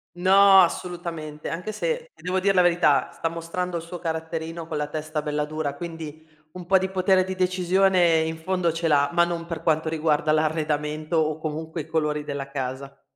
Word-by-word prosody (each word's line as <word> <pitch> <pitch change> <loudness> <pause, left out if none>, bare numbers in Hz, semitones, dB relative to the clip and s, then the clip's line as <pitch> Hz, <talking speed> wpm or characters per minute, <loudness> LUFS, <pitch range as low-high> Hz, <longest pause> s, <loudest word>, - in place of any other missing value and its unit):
No, 195 +2 +6
assolutamente, 170 -4 -3
anche 180 +6 -4
se - - -3
ti - - -21
devo 185 +1 0
dir 195 +1 +3
la 180 - +5
verità, 170 -5 +3
sta 165 - -2
mostrando 170 +2 -4
il 165 - -6
suo 175 +1 -8
caratterino 160 0 -4
con 160 - -5
la 150 0 -1
testa 155 0 -4
bella 150 0 -2
dura, 155 -1 -3
quindi 160 -1 -8 0.2
un 180 +1 -9
po' 190 +2 +4
di 190 +1 -1
potere 185 0 +3
di 190 0 -4
decisione 185 -1 +3
in 160 0 -2
fondo 175 0 -1
ce 165 0 -1
l'ha, 145 -1 +3
ma 170 0 +4
non 170 -1 -3
per 165 -1 -6
quanto 160 -1 +1
riguarda 155 -1 +1
l'arredamento 155 0 -1
o 155 -1 +1
comunque 160 +1 -5
i - - -11
colori 150 -2 -1
della 140 -1 -5
casa. 135 0 -5
165 Hz, 190 wpm, -24 LUFS, 155-180 Hz, 0.2 s, No